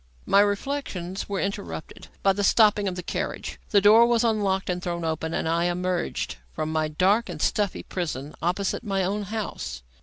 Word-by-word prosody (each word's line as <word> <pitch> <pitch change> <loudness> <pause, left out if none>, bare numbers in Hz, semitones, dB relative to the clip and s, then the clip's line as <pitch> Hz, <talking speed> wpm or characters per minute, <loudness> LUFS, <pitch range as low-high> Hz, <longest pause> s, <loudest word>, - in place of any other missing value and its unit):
My 200 - +5
reflections 205 -4 -1
were 200 -1 -1
interrupted 85 - -5 0.2
by 195 - +5
the 205 +1 -2
stopping 210 0 +4
of 185 - -2
the 180 - -5
carriage. - - -4
The 205 -3 +4
door 220 +4 +7
was 235 -1 +3
unlocked 205 -4 +1
and 180 -1 -1
thrown 170 -1 -3
open, 160 0 -2
and 160 - -1
I 170 +1 +1
emerged 180 - -1 0.2
from 155 0 -3
my 155 -1 +1
dark 190 +8 +2
and 165 -4 -6
stuffy 205 +5 0
prison 155 -5 -4
opposite 185 +6 -1
my 195 -3 0
own 200 +3 -1
house. 210 - -5
190 Hz, 180 wpm, -25 LUFS, 170-205 Hz, 0.2 s, door